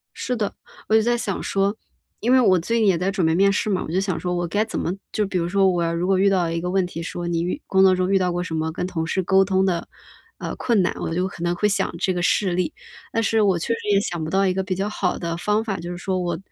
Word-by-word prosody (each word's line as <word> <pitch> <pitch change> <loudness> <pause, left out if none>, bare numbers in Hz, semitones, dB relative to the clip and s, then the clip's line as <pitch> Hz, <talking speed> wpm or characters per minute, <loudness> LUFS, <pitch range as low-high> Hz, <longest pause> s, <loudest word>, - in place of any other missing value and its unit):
是 250 - -2
的。 210 -4 -2 0.3
我 220 - +3
就 220 - +6
在 240 +2 +1
想 200 -5 -3
说 195 +1 0 0.4
因 235 - 0
为 260 - +6
我 190 -6 +4
最 230 +8 0
近 220 - +3
也 185 -3 +4
在 185 +3 0
准 190 -3 0
备 160 - +3
面 195 +2 +4
试 205 +1 0
嘛， 190 -3 0
我 - - -6
就 180 - +1
想 190 -3 -1
说 180 -1 -2
我 175 0 -1
该 205 +6 0
怎 225 - -4
么 - - -1 0.2
就 215 - 0
比 195 -1 -2
如 170 -1 0
说， 195 +1 +3
我 175 -2 0
要 165 0 0
如 170 +1 -1
果 190 0 +2
遇 200 +1 +4
到 180 -4 +1
一 165 - -1
个 180 +1 -3
问 190 0 +1
题， 170 -2 -6
说： 175 +1 -5
“你 165 -1 0
遇 180 - -3
工 190 - +2
作 190 -1 +6
中 185 +1 0
遇 195 - +5
到 185 -1 +1
过 175 0 -1
什 180 - -6
么 160 0 -1
跟 180 - -3
同 165 -3 -3
事 190 +3 0
沟 190 +2 +4
通 190 0 +2
的， 175 -3 -1 0.5
呃， - - -5
困 230 -5 +2
难”， 180 - 0
我 165 - -3
就 180 +2 0
可 170 - -11
能 175 0 0
会 210 +4 +1
想 200 -1 -1
这 185 - 0
个 175 - -2
事 185 +2 +2
例， 175 -1 -1 0.4
但 225 - +1
是 225 0 +2
我 195 -4 +3
确 165 - -4
实 230 - -4
也 200 - +4
想 175 -4 -3
不 155 - -3
到 195 +3 +2
一 185 - +2
个 190 +1 -1
比 185 -1 -2
较 195 +3 -2
好 195 -3 -1
的 170 -1 -3
方 210 +5 0
法。 205 -4 -3
就 175 +1 -6
是 175 - -5
说 185 +1 -2
我 175 -2 -2
185 Hz, 335 characters per minute, -22 LUFS, 175-200 Hz, 0.5 s, 就